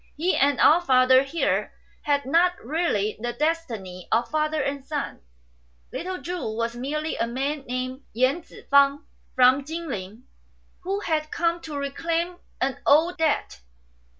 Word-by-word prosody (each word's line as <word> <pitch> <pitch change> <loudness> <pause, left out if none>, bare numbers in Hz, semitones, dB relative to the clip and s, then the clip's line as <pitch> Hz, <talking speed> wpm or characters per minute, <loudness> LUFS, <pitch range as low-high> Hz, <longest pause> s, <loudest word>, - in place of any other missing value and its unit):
He 350 +5 +1
and 280 0 +2
our 330 +4 +6
father 260 -4 +5
here 275 +5 -1 0.3
had 285 -2 0
not 340 +6 +3
really 240 - 0
the 240 +2 -3
destiny 235 - -3
of 235 +2 +1
father 305 0 0
and 275 0 -2
son. 290 - -4 0.7
Little 370 +1 -4
Chu 340 -11 -4
was 235 0 -1
merely 300 +5 -3
a 230 - 0
man 270 +4 -3
named 255 +2 -3
Yen 255 +8 +1
Tzu - - -15
fang, 280 0 +4 0.3
from 255 +2 +5
Chin 325 +3 -5
ling, 210 -2 -6 0.6
who 390 +3 -3
had 310 -4 -1
come 335 +1 0
to 305 -3 -6
reclaim 330 +5 -2 0.2
an 265 0 -1
old 325 +5 +4
debt." 295 - 0
285 Hz, 150 wpm, -25 LUFS, 255-330 Hz, 0.7 s, our